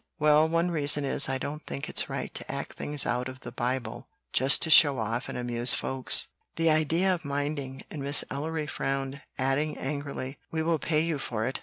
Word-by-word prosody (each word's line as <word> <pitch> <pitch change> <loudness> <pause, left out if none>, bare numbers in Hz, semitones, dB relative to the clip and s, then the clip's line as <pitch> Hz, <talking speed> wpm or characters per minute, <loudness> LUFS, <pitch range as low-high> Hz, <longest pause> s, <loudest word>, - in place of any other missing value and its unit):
"Well, 150 0 +4
one 170 +2 +1
reason 145 -2 +3
is 135 0 +2
I 135 - 0
don't 145 +3 -6
think 70 -1 -5
it's - - +3
right - - -5
to - - -6
act - - -5
things 145 -2 +1
out 125 +1 -1
of 130 0 -11
the - - -7
Bible 125 +1 -4 0.3
just 135 +2 +4
to 160 - 0
show 145 -4 +7
off 115 +3 -3
and - - -5
amuse 120 0 +3
folks." 130 -1 +2 0.3
"The 165 -1 +2
idea 165 +5 +2
of 175 -1 -5
minding!" 140 -2 -4
and 150 - -6
Miss 140 +1 +4
Ellery 155 +2 -3
frowned, 135 -1 -3 0.2
adding 135 +3 0
angrily, 140 -1 -5
"We 160 0 -2
will 165 -1 0
pay 155 0 +1
you 160 -3 -1
for 110 -4 -3
it. 130 +3 -3
140 Hz, 200 wpm, -27 LUFS, 130-155 Hz, 0.3 s, show